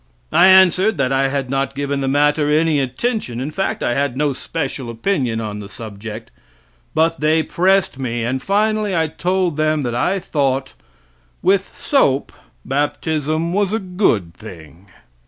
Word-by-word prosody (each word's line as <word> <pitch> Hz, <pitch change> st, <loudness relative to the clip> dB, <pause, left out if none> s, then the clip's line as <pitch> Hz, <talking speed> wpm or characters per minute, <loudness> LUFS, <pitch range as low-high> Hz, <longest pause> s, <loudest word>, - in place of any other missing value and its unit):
I 185 Hz, -, +6 dB
answered 190 Hz, +1 st, +5 dB
that 135 Hz, -2 st, 0 dB
I 135 Hz, 0 st, +2 dB
had 135 Hz, -1 st, -2 dB
not 135 Hz, 0 st, -1 dB
given 140 Hz, 0 st, -2 dB
the 135 Hz, -, -1 dB
matter 145 Hz, +2 st, +2 dB
any 155 Hz, 0 st, +2 dB
attention, 135 Hz, -, -2 dB
in 135 Hz, +4 st, -3 dB
fact 195 Hz, +5 st, -2 dB
I 120 Hz, -, +1 dB
had 140 Hz, -1 st, -1 dB
no 145 Hz, -1 st, +1 dB
special 135 Hz, -2 st, -4 dB
opinion 120 Hz, -, -1 dB
upon 105 Hz, -2 st, -5 dB
the 100 Hz, -1 st, -9 dB
subject. 110 Hz, 0 st, -8 dB, 0.6 s
But 165 Hz, +1 st, +2 dB
they 155 Hz, +1 st, +2 dB
pressed 185 Hz, -5 st, +1 dB
me 120 Hz, -3 st, -2 dB
and 130 Hz, +3 st, -2 dB
finally 210 Hz, +1 st, +1 dB
I 165 Hz, -1 st, +2 dB
told 180 Hz, 0 st, -1 dB
them 155 Hz, -1 st, +1 dB
that 120 Hz, -2 st, -2 dB
I 175 Hz, +11 st, +1 dB
thought, 135 Hz, -6 st, -1 dB, 0.7 s
with 190 Hz, +1 st, +1 dB
soap 145 Hz, -, +1 dB, 0.3 s
baptism 155 Hz, +3 st, -1 dB
was 205 Hz, 0 st, +1 dB
a -, -, +2 dB
good 180 Hz, -, 0 dB
thing. 85 Hz, -3 st, -13 dB
145 Hz, 155 wpm, -19 LUFS, 130-180 Hz, 0.7 s, I